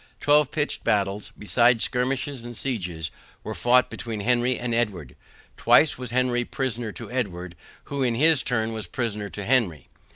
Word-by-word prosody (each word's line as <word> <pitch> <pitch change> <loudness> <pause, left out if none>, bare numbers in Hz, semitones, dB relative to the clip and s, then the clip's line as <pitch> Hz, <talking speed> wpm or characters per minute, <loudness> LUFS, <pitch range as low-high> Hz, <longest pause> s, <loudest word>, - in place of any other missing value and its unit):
Twelve 150 0 +4
pitched 150 -1 -2
battles, 100 0 0
besides 120 +2 +3
skirmishes 130 +1 -1
and 120 -1 -7
sieges, 90 - -3 0.3
were - - -5
fought 125 +1 +3
between 110 -3 -5
Henry 120 +2 +1
and 120 -1 -3
Edward. 95 - -2 0.4
Twice 155 - +5
was 125 -2 -5
Henry 120 0 +1
prisoner 120 -3 -3
to - - -6
Edward, 90 -8 -3 0.3
who 140 -1 -4
in 120 -3 +1
his 155 +2 +4
turn 115 -2 -1
was 110 -1 -5
prisoner 105 -4 -3
to 100 -1 -6
Henry. 95 - +1
120 Hz, 160 wpm, -25 LUFS, 105-125 Hz, 0.4 s, Twice